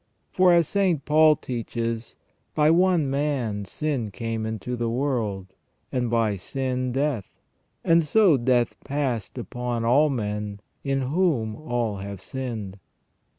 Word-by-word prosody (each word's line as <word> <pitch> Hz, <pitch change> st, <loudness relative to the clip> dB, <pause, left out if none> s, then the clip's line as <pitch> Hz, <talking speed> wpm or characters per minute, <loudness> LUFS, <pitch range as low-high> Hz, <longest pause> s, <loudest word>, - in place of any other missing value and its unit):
For, 185 Hz, -1 st, +5 dB
as 170 Hz, -3 st, +4 dB
St. 185 Hz, -8 st, +1 dB
Paul 155 Hz, 0 st, +6 dB
teaches: 115 Hz, -2 st, -4 dB, 0.2 s
" -, -, -45 dB
By 150 Hz, 0 st, +4 dB
one 175 Hz, -3 st, +3 dB
man 135 Hz, -7 st, -1 dB
sin 135 Hz, 0 st, -2 dB
came 115 Hz, 0 st, -3 dB
into 110 Hz, +3 st, -4 dB
the 120 Hz, -1 st, -1 dB
world, 115 Hz, -7 st, -2 dB, 0.4 s
and 125 Hz, -2 st, 0 dB
by 115 Hz, -3 st, +1 dB
sin 130 Hz, +4 st, -2 dB
death: 135 Hz, -5 st, -2 dB, 0.5 s
and 165 Hz, 0 st, +4 dB
so 185 Hz, +1 st, +5 dB
death 120 Hz, -1 st, +2 dB
passed 130 Hz, -6 st, -2 dB
upon 120 Hz, -1 st, -3 dB
all 140 Hz, +6 st, +4 dB
men 105 Hz, -4 st, -3 dB, 0.2 s
in 135 Hz, -1 st, 0 dB
whom 130 Hz, -, +1 dB
all 120 Hz, -7 st, -2 dB
have 100 Hz, 0 st, -6 dB
sinned 110 Hz, -3 st, -5 dB
125 Hz, 135 wpm, -25 LUFS, 110-150 Hz, 0.5 s, Paul